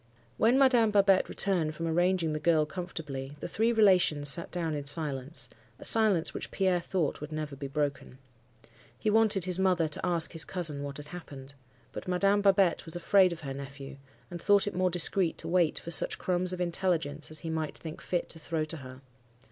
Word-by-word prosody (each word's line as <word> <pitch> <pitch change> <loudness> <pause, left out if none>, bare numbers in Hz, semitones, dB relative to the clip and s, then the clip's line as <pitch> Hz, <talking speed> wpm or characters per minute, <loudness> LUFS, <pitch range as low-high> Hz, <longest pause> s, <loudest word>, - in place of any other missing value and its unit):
"When 235 +4 +3
Madame 250 -5 +4
Babette 200 -2 +3
returned 170 -6 -1
from 165 - -4
arranging 175 0 +1
the 155 - -3
girl 155 -1 +2
comfortably, 150 -5 -7
the - - -5
three 225 +2 +1
relations 185 -10 +3
sat 165 +5 0
down 165 -3 -3
in 145 -1 -4
silence; 145 0 -2 0.3
a - - -4
silence 210 -7 +5
which - - -6
Pierre 185 -2 +1
thought 170 -4 -2
would 150 +1 -7
never 155 -2 -5
be 140 0 -6
broken. 140 -2 -3 0.8
He 210 - -1
wanted 215 -4 +3
his 180 0 -1
mother 180 -4 +2
to 150 - -1
ask 170 -3 0
his 165 -1 +2
cousin 155 -5 -4
what 140 -1 -6
had 145 0 -10
happened. 140 -6 -10 0.4
But - - -8
Madame 195 +3 +2
Babette 195 -3 +3
was 165 0 +1
afraid 185 +2 +3
of 170 -1 -7
her 135 -3 -6
nephew, 140 0 -9 0.3
and 175 -1 -7
thought 205 +1 +4
it 205 - -4
more 185 +1 +1
discreet 175 0 +2
to - - -6
wait 170 -2 +2
for 170 - -6
such - - +1
crumbs 180 0 0
of 180 - -3
intelligence 165 -4 -1
as 155 - 0
he 165 - -5
might 160 -1 -4
think 160 -1 -9
fit 175 - -2
to 165 - -1
throw 160 -1 -3
to 160 +1 +1
her. 130 -2 -11
170 Hz, 200 wpm, -29 LUFS, 150-185 Hz, 0.8 s, silence